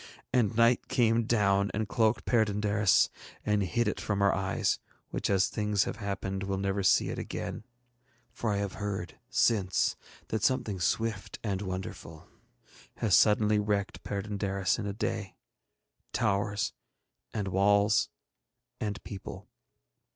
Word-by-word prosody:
And 115 -3 +2
night 115 +2 +4
came 115 -1 +2
down 100 -3 +2
and 110 0 -1
cloaked 110 +1 +1
Perd├│ndaris 105 -3 +3 0.4
and 105 -1 +2
hid 115 +5 0
it 105 - -2
from 100 -1 0
our 100 - +4
eyes, 95 0 0 0.3
which - - -2
as 95 -1 +3
things 105 -2 +1
have - - -4
happened 95 -2 -3
will 100 0 -2
never 100 +1 -1
see 95 - +4
it - - -4
again; - - -5 0.7
for 115 -1 -2
I 100 - 0
have 100 -1 -2
heard 95 -3 -4
since 100 -7 +2 0.3
that 110 - -1
something 110 -7 +1
swift 110 +3 -1
and 100 -3 -1
wonderful 95 -4 -6 0.7
has 105 -6 +3
suddenly 105 +2 +4
wrecked 105 -1 -1
Perd├│ndaris 100 -1 -1
in 105 - -3
a 100 - -2
day 105 -1 -3 0.8
towers, 100 +1 0 0.6
and 100 -3 -2
walls, 100 +2 +3 0.7
and 105 -2 -3
people. 100 -2 -8
100 Hz, 135 wpm, -30 LUFS, 100-110 Hz, 0.8 s, night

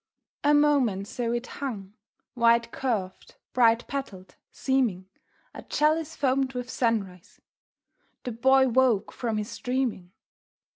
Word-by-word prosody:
A 295 +1 +4
moment 265 -10 +2
so 235 +1 -3
it 240 +1 -2
hung, 210 -10 -6 0.4
wide 235 -1 +3
curved, 210 -8 -3 0.2
bright 235 -1 +3
petalled, 215 -10 -6 0.2
seeming 240 -9 0 0.5
A - - -9
chalice 310 +1 0
foamed 265 -1 0
with 250 0 -5
sunrise. 200 -7 -2 0.8
The 250 - -4
Boy 265 +3 +4
woke 250 -4 +2
from 230 -3 -3
his 210 0 -4
dreaming. 245 -8 -2
245 Hz, 115 wpm, -26 LUFS, 215-265 Hz, 0.8 s, A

